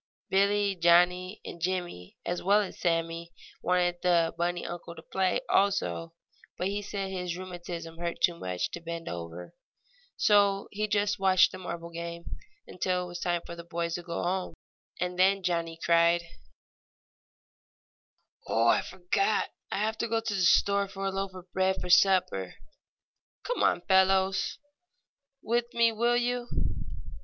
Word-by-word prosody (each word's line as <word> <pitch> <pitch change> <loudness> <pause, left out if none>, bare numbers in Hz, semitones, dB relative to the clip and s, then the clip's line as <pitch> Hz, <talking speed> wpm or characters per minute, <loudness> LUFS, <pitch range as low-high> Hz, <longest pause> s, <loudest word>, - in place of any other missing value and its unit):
Billie, 200 +1 +3
Johnnie 180 +2 +3
and 170 - -8
Jimmie, 175 - -3
as 175 - -2
well 200 +3 +4
as 200 - -6
Sammie, 165 0 -1 0.3
wanted 175 -1 +1
the 170 -2 +3
bunny 175 +1 -1
uncle 170 0 -7
to 160 - -11
play 190 +1 0
also, 195 -4 +1 0.4
but 185 - -1
he 205 +1 -2
said 195 -1 -4
his 180 -2 -3
rheumatism 175 -2 -7
hurt 170 0 -3
too 175 - +3
much 90 - -3
to 175 - -6
bend 170 0 -6
over. 85 +1 -7 0.6
So 200 -1 +3
he 215 +1 -1
just 205 0 +1
watched 190 -1 +5
the 185 - -8
marble 170 -2 -6
game, 170 0 -6 0.4
until 180 0 -1
it - - -6
was 175 0 -6
time 175 -1 -1
for 170 - -7
the 170 - -9
boys 170 0 -3
to 175 - -3
go 170 -1 -4
home. 185 +1 -2 0.4
And 180 0 -2
then 195 +1 +4
Johnnie 170 -2 -1
cried: 170 +1 +3 2.2
"Oh, 115 +1 +3
I - - +4
forgot! 190 - 0 0.2
I - - -1
have 220 +2 -1
to 235 - 0
go 225 0 +1
to 225 -1 -3
the 195 - -1
store 200 +3 +4
for 195 0 -6
a 195 - 0
loaf 195 0 -3
of 180 0 -12
bread 190 0 +1
for 180 - -3
supper. 180 - +3 0.9
Come - - -2
on, - - +3
fellows, 190 0 +3 0.9
with 235 +1 0
me, 230 -1 +4
will 235 +2 +2
you?" 245 0 -1
180 Hz, 155 wpm, -29 LUFS, 170-195 Hz, 2.2 s, watched